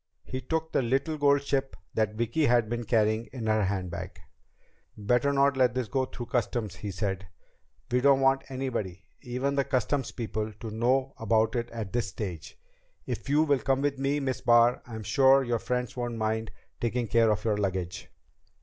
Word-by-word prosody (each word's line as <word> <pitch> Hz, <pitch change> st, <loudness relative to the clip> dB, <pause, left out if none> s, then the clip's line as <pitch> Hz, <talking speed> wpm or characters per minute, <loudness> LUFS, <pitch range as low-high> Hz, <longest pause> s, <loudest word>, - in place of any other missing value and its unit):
He 130 Hz, 0 st, -5 dB
took 160 Hz, +5 st, -2 dB
the -, -, +2 dB
little 135 Hz, +6 st, 0 dB
gold 140 Hz, -1 st, +4 dB
ship 135 Hz, -3 st, -1 dB, 0.2 s
that 110 Hz, -1 st, 0 dB
Vicki 120 Hz, +7 st, +1 dB
had 120 Hz, -2 st, +3 dB
been 120 Hz, +1 st, -3 dB
carrying 110 Hz, 0 st, +2 dB
in 120 Hz, -4 st, -7 dB
her 110 Hz, -2 st, +2 dB
handbag. 90 Hz, -2 st, -4 dB, 0.8 s
"Better 120 Hz, +6 st, +2 dB
not 140 Hz, 0 st, +3 dB
let 125 Hz, -1 st, +3 dB
this 130 Hz, -3 st, -1 dB
go 130 Hz, +6 st, 0 dB
through 125 Hz, -1 st, -7 dB
Customs," 115 Hz, -4 st, -2 dB
he 105 Hz, -, -5 dB
said. 95 Hz, -1 st, -3 dB, 0.6 s
"We 125 Hz, +1 st, +2 dB
don't 140 Hz, 0 st, +5 dB
want 135 Hz, 0 st, +3 dB
anybody, 130 Hz, -9 st, -4 dB, 0.2 s
even 130 Hz, +2 st, -2 dB
the 140 Hz, 0 st, +2 dB
Customs 130 Hz, +1 st, -1 dB
people, 110 Hz, -2 st, -3 dB
to 110 Hz, +1 st, -8 dB
know 130 Hz, +5 st, +1 dB
about 110 Hz, +1 st, +2 dB
it 120 Hz, 0 st, -2 dB
at 110 Hz, -4 st, -6 dB
this 120 Hz, -2 st, 0 dB
stage. 90 Hz, -, -6 dB, 0.5 s
If -, -, -5 dB
you 150 Hz, +2 st, +4 dB
will 145 Hz, -3 st, +2 dB
come 135 Hz, +1 st, 0 dB
with 140 Hz, -2 st, 0 dB
me, 140 Hz, +2 st, +1 dB
Miss 130 Hz, -2 st, -2 dB
Barr, 120 Hz, -1 st, +5 dB
I'm 110 Hz, -2 st, -7 dB
sure 135 Hz, +5 st, +5 dB
your 120 Hz, -2 st, 0 dB
friends 125 Hz, 0 st, -2 dB
won't 120 Hz, -2 st, -3 dB
mind 110 Hz, 0 st, -1 dB, 0.3 s
taking 120 Hz, +1 st, -1 dB
care 115 Hz, +1 st, +4 dB
of 105 Hz, +1 st, 0 dB
your 105 Hz, -2 st, +1 dB
luggage." 95 Hz, -3 st, -3 dB
120 Hz, 185 wpm, -28 LUFS, 110-135 Hz, 0.8 s, don't